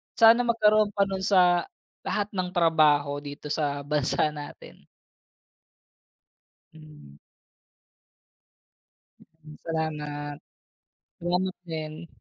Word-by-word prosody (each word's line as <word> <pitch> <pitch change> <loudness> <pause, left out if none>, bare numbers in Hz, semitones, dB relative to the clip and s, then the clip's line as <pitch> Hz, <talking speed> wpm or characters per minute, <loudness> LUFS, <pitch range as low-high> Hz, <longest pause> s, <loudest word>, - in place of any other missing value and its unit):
Sana 230 +1 +7
magkaroon 215 -2 +4
pa 200 - +3
nun 195 -1 -3
sa 180 -3 +3 0.3
lahat 205 0 -3
ng 185 -2 -2
trabaho 150 -4 +3
dito 145 0 -8
sa 145 -2 -2
bansa 150 +1 0
natin. 145 -1 -11 1.9
Hmm. 150 - -15 2.0
Mm, 155 -2 -17
salamat. 150 -2 -4 0.8
Salamat 180 +2 -1
din. 155 +1 -6
160 Hz, 85 wpm, -26 LUFS, 150-185 Hz, 2.0 s, Sana